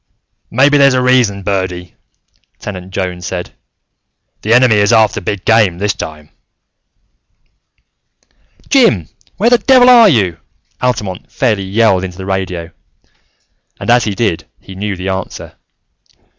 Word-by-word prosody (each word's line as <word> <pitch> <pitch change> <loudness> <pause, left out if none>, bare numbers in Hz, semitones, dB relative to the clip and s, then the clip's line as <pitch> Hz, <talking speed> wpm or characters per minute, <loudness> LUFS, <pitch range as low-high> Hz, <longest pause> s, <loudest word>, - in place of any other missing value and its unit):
"Maybe 140 +4 +3
there's 140 -2 +4
a 130 - +1
reason, 120 -6 +1
Birdy," 95 -3 -3 0.6
Tenant 95 -2 -8
Jones 90 -2 -4
said. 90 -1 -5 0.9
"The 110 - -3
Enemy 120 -2 +4
is 105 +1 +2
after 110 -2 +2
big 100 -2 -4
game, 110 -6 +3
this 105 +2 -1
time." 75 -1 -9 2.4
"Jim, 115 - +2 0.3
where 230 +5 +2
the 245 - +5
devil 255 -1 +5
are 235 -4 +7
you?" 95 - 0 0.4
Altamont 105 -7 -3
fairly 110 -8 -1
yelled 95 -1 +1
into 90 -2 -7
the 95 - -7
radio; 90 -3 -4 1.1
and - - -1
as 120 0 +3
he 105 -3 -3
did, 95 -6 -2
he 95 - -13
knew 100 +1 -4
the 90 +1 -5
answer. 95 0 -6
100 Hz, 130 wpm, -14 LUFS, 95-125 Hz, 2.4 s, are